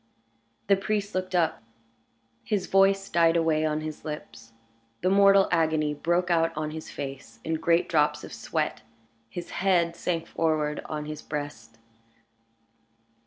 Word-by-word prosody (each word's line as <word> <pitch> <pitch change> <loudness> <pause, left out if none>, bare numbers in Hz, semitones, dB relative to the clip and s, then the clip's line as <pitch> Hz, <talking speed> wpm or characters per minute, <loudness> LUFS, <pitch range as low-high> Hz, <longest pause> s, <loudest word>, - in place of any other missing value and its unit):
The 200 - +5
priest 205 +1 -2
looked 185 0 -2
up; 160 -5 +1 0.8
his 205 -4 -1
voice 195 0 +3
died 170 -2 +3
away 160 -2 +2
on 155 0 -1
his 155 -1 -6
lips; 115 -7 -8 0.5
the 185 - +2
mortal 195 0 +6
agony 160 -3 +2
broke 175 +4 0
out 165 -1 +3
on 155 0 -2
his 160 0 -7
face 135 -5 -7
in 160 - -2
great 170 +2 +2
drops 150 -2 +2
of - - -9
sweat; - - -2 0.5
his 175 +8 -7
head 175 -3 +2
sank 170 -1 -2
forward 155 -2 0
on 150 -1 -4
his 150 0 -6
breast. 145 -7 -6
165 Hz, 140 wpm, -27 LUFS, 150-185 Hz, 0.8 s, mortal